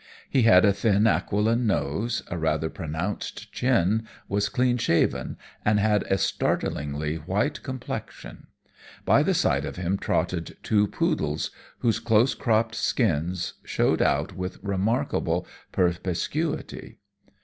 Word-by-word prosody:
He 135 - +3
had 95 -4 +6
a 100 - +5
thin, 100 +1 +2
aquiline 110 +2 +2
nose, 110 +3 -1
a - - -4
rather 80 -1 0
pronounced 80 +4 -5
chin, 110 -3 +1 0.2
was 100 +1 0
clean 125 -1 +1
shaven, 85 - +1 0.3
and 105 0 +3
had 105 -1 +3
a 95 - +1
startlingly 75 -3 -1
white 100 - -1
complexion. 130 -3 -7 0.6
By - - +5
the - - +1
side - - +2
of - - -5
him 90 +2 -1
trotted - - -1
two 105 -1 +3
poodles, 125 - -1 0.3
whose 115 -4 +2
close 115 +3 +3
cropped 115 -1 +1
skins 90 - 0
showed - - +1
out - - +1
with 90 0 -5
remarkable 100 +4 0 0.3
perspicuity. 90 - -2
100 Hz, 125 wpm, -26 LUFS, 90-115 Hz, 0.6 s, had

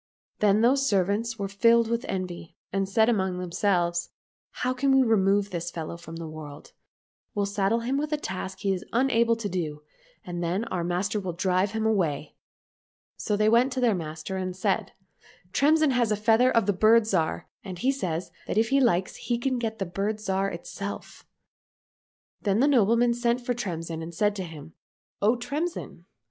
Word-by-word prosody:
Then 210 0 +4
those 270 +3 +3
servants 205 +4 0
were 200 - -2
filled 230 +3 +4
with 235 +2 -2
envy, 180 -3 -5 0.2
and 195 0 0
said 220 +2 +3
among 190 -6 +1
themselves, 175 -1 0 0.2
" - - -85
How 255 0 +1
can 270 +2 +1
we 265 - +6
remove 200 -3 +2
this 175 -1 -3
fellow 165 -1 -5
from 170 -1 -10
the 165 -1 -6
world? 155 -2 -10 0.6
We'll 205 -1 +1
saddle 200 +3 0
him 255 +4 -1
with 300 +1 -3
a 300 - +1
task 190 -6 -5
he 195 -1 +1
is 185 - -4
unable 235 -2 +3
to 225 -2 -4
do, 155 -6 -4 0.4
and 175 -1 -4
then 180 +6 0
our 180 -6 -3
master 180 +5 -1
will 185 -3 -4
drive 185 +3 +1
him 220 0 -1
away." 170 -10 0 0.4
— - - -
So 210 -2 -1
they 215 +1 +3
went 235 +4 +4
to 260 - -2
their 240 -3 +3
master 160 +1 -5
and 185 -1 -3
said, 190 - -1 0.3
" - - -27
Tremsin 310 +1 +4
has 240 -3 +1
a - - +3
feather 225 +4 +4
of 230 -5 +2
the 205 - +2
Bird 220 +4 +5
Zhar, 175 -7 0 0.2
and 185 -3 -7
he 255 +10 +2
says 180 -11 -3 0.2
that - - -2
if 225 +1 +3
he 275 +1 +4
likes 185 -7 +2
he 240 - -2
can 255 +1 -1
get 220 -2 -3
the 195 - -2
Bird 195 +5 -2
Zhar 195 -1 0
itself." 200 +4 -7 1.1
Then 205 0 +1
the 275 - +4
nobleman 235 -2 +4
sent 240 0 +1
for 245 - +1
Tremsin 165 -8 -4
and 165 +1 -7
said 205 +3 +1
to 190 - -3
him, 160 -1 -10 0.2
" - - -62
O 215 +4 +4
Tremsin 285 - -4
200 Hz, 195 wpm, -26 LUFS, 180-235 Hz, 1.1 s, we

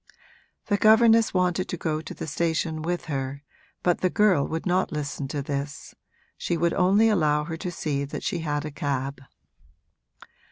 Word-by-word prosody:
The 205 - +1
governess 225 +1 +5
wanted 180 0 0
to 180 - -3
go 155 -1 -2
to 155 - -9
the - - -5
station 160 +1 -1
with 175 +2 -2
her, 140 -1 -4 0.4
but 175 -1 +1
the 185 - +2
girl 195 -8 +3
would 160 0 -4
not 185 +1 +1
listen 145 -2 -4
to 140 +1 -3
this 140 0 -5 0.5
she 170 - -1
would 170 +1 +1
only 200 +4 +4
allow 155 -8 +2
her 165 +1 -5
to 180 +2 -4
see 145 -5 -2
that 140 - -6
she 175 - -1
had 150 -2 -2
a 150 - -5
cab. 140 -1 -3
160 Hz, 170 wpm, -25 LUFS, 145-180 Hz, 0.5 s, governess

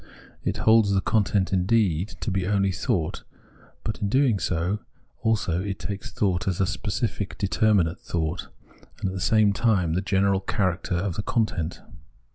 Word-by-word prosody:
It - - -1
holds 110 -2 +5
Scepticism 100 -1 +2
I95 - - -26
the - - -2
content 100 -3 +2
indeed 95 -2 +2
to 110 - -1
be 95 -1 -1
only 100 -1 +2
thought, 90 -2 -1 0.6
but 110 - -3
in 100 - 0
doing 130 -4 +3
so 90 +4 -1 0.4
also 95 -5 +1
takes 100 0 -6
thought 95 -4 0
as 90 -3 0
a 95 - +3
specific - - -3
determinate 100 -4 +2
thought, 80 -3 -3 0.5
and 95 - -1
at - - -5
the 95 - -4
same 110 -1 +4
time 95 -8 +2
the 90 - +1
general 95 0 +2
character 95 -1 -1
of 90 0 -2
the - - 0
content. 100 -7 -1
95 Hz, 165 wpm, -25 LUFS, 90-105 Hz, 0.6 s, holds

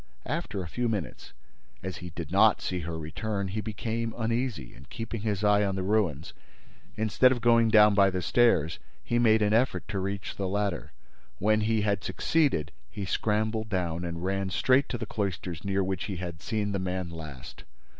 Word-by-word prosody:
After 95 -1 -3
a - - -6
few 120 +7 -1
minutes, 100 -8 -4 0.5
as 95 0 -4
he 90 - -7
did 85 -2 -7
not 105 +2 +5
see 90 - -3
her 85 -1 -4
return, 100 +6 -3
he 110 +3 -3
became 115 +1 -3
uneasy 115 - -2
and, 70 +3 -16
keeping 115 +1 -5
his 105 -2 -1
eye 105 0 +4
on 100 -1 0
the 95 - -2
ruins, 95 -7 0 0.6
instead 110 +4 +4
of 125 - 0
going 115 -1 +4
down 105 -2 +7
by 100 -1 +5
the 90 -1 -3
stairs 100 -11 +3 0.2
he 120 - 0
made 110 -2 +4
an 105 0 +2
effort 120 +4 +1
to 100 - -2
reach 100 +1 -4
the 95 - -1
ladder. 100 -2 -2 0.5
When 110 +2 +2
he 110 0 +1
had 100 -2 0
succeeded, 95 - +1 0.2
he 100 +9 -5
scrambled 110 +2 0
down 90 -3 -1
and 85 0 -4
ran 95 0 -1
straight 130 +8 +3
to 120 - -2
the 115 - -4
cloisters 95 -6 -4
near 100 0 0
which 95 -1 -2
he 100 - -4
had 85 -1 -6
seen 105 -2 -1
the 100 - -1
man 90 -1 -3
last. 75 -6 -9
100 Hz, 190 wpm, -28 LUFS, 90-110 Hz, 0.6 s, down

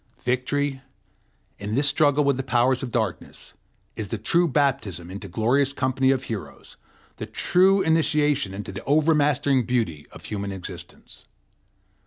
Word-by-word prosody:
Victory, 135 +2 -1 0.8
in 105 +2 -3
this 145 +2 +3
struggle 145 -1 +3
with 140 -1 +2
the 135 - -2
powers 125 +1 +1
of 130 - -4
darkness, - - -4 0.4
is 110 - -4
the 115 - -3
true 170 - +2
baptism 130 - -1
into 100 +1 -7
the - - -15
glorious 130 +7 +1
company 130 0 +1
of 135 -1 +1
heroes, 110 -6 -8 0.4
the - - -6
true 190 +2 +3
initiation 150 -6 +1
into 100 0 -6
the 95 - -8
overmastering 145 -3 +2
beauty 110 -12 -2
of - - -12
human 100 -2 -4
existence. 95 -2 -10
130 Hz, 145 wpm, -24 LUFS, 110-145 Hz, 0.8 s, this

